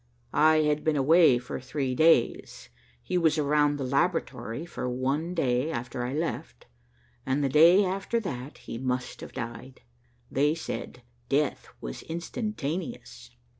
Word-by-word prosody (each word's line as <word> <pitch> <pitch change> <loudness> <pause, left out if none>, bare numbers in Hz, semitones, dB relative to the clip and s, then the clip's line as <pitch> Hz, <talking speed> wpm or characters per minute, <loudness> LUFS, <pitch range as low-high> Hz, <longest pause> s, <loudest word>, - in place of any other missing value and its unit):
I 155 +1 +5
had 150 0 0
been 155 -1 +1
away 150 -1 +5
for 120 0 -6
three 130 0 -3
days. 155 -3 +2 0.3
He 180 - 0
was 160 -2 +2
around 145 0 +2
the 140 - -3
laboratory 140 -1 -1
for 155 -6 -4
one 140 +8 -1
day 130 -2 +1
after 120 -3 -4
I 125 - -3
left, 150 - -4 0.6
and 140 +2 0
the 135 - +1
day 170 +8 +6
after 195 +5 -1
that 140 - -6
he 115 - -8
must 125 -1 -3
have - - -9
died. 125 +2 -7 0.5
They 145 +3 +2
said 125 -6 -6 0.3
death 145 0 0
was - - -6
instantaneous." 170 - -5
145 Hz, 140 wpm, -27 LUFS, 130-165 Hz, 0.6 s, day